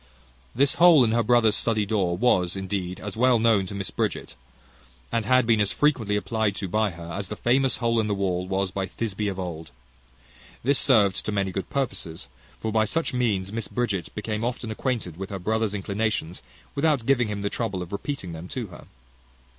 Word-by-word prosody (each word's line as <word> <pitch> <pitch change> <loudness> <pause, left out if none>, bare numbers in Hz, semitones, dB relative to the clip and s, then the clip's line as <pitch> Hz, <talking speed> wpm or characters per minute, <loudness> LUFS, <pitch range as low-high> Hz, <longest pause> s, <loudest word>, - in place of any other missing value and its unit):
This 140 +3 +4
hole 170 -6 +8
in 110 - +2
her 120 +1 +3
brother's 115 -1 +4
study 110 -3 +1
door 95 -4 0
was 90 -5 +2
indeed 95 -1 -3
as 105 0 -6
well 125 +1 +4
known 110 -4 +3
to 100 - -7
Mrs 100 -1 -5
Bridget, - - -2 0.8
and 115 -2 0
had 130 +2 +4
been 115 -2 +3
as 100 - +2
frequently 125 -9 +1
applied 105 +1 0
to 95 - -4
by 110 +3 +1
her, 85 -1 -9
as 100 -1 -4
the 105 - -5
famous 125 +4 +2
hole 115 -1 +1
in 110 - +1
the 105 - 0
wall 90 -2 -1
was 95 0 -1
by 95 0 -2
Thisbe 105 -2 -3
of 95 - -5
old. 85 -4 -5 0.9
This 140 +2 +3
served 105 -8 +3
to - - -2
many 100 -2 0
good 95 +1 -4
purposes. 95 -12 -3 0.3
For 110 - -2
by 110 0 +3
such 165 +7 -1
means 105 -6 0
Mrs 115 0 -4
Bridget 105 -8 -2
became 105 +1 -3
often 120 -2 -3
acquainted 110 - -3
with 95 +1 -5
her 100 - -4
brother's 110 +2 -1
inclinations, 100 -3 -2 0.3
without 140 -5 +1
giving 125 -3 +3
him 105 -1 -4
the 100 - -1
trouble 100 -6 -2
of 90 - -11
repeating 100 - -4
them 80 +2 -7
to 120 +2 -4
her. - - -12
105 Hz, 200 wpm, -25 LUFS, 95-115 Hz, 0.9 s, hole